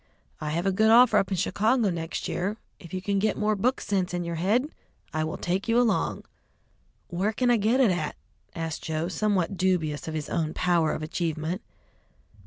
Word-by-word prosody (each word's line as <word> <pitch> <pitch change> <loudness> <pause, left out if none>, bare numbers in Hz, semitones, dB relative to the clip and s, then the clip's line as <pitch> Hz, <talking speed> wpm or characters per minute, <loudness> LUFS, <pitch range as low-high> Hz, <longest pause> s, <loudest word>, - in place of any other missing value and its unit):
I 150 - -3
have 170 +4 -1
a 195 - +3
good 220 +3 +3
offer 230 -2 +7
up 195 - -1
in 190 - -1
Chicago 215 +4 +2
next 165 -1 -4
year; 200 +5 -2 0.2
if 170 - -12
you 185 0 -4
can 200 0 +1
get 210 +1 +1
more 215 0 +1
book 250 +7 +1
sense 185 -3 -1
in 175 - -2
your 170 -1 -4
head, 230 - +1 0.4
I 155 0 0
will 160 - -3
take 185 +4 -2
you 230 +1 +3
along." 240 -3 +1 0.9
"Where 185 +5 0
can 245 +3 +1
I 240 - +4
get 225 +5 +2
it 245 -7 +5
at?" 160 -4 -2 0.4
asked 165 -2 -4
Joe, 160 +1 -2
somewhat 195 -2 0
dubious 165 -6 0
of 160 - -4
his 155 -2 -3
own 160 -2 -2
power 175 -3 +2
of - - -4
achievement. 160 +2 -2
185 Hz, 195 wpm, -26 LUFS, 165-215 Hz, 0.9 s, offer